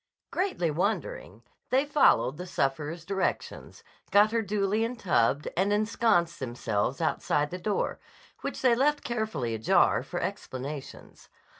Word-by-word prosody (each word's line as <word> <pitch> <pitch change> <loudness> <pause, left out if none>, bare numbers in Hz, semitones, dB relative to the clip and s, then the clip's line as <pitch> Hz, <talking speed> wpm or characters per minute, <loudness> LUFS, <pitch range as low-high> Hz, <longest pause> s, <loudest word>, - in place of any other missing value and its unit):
_" - - -58
Greatly 360 - 0
wondering 155 - -2 0.3
they 265 +3 +3
followed 280 - +3
the 180 +1 -6
sufferer's 155 +3 -2
directions, 195 0 -3 0.3
got 205 +2 +5
her 230 0 +1
duly 210 +1 0
en 235 +2 -2
tubbed, 140 - +1
and 195 +3 +1
ensconced 210 -5 +2
themselves 120 +1 -2
outside 150 -2 0
the 180 - -5
door, 205 +2 -1 0.4
which - - -5
they 250 -2 +5
left 290 +5 +2
carefully 215 - -2
ajar 110 0 +3
for - - -5
explanations. 135 +2 -6
180 Hz, 135 wpm, -28 LUFS, 140-220 Hz, 0.4 s, got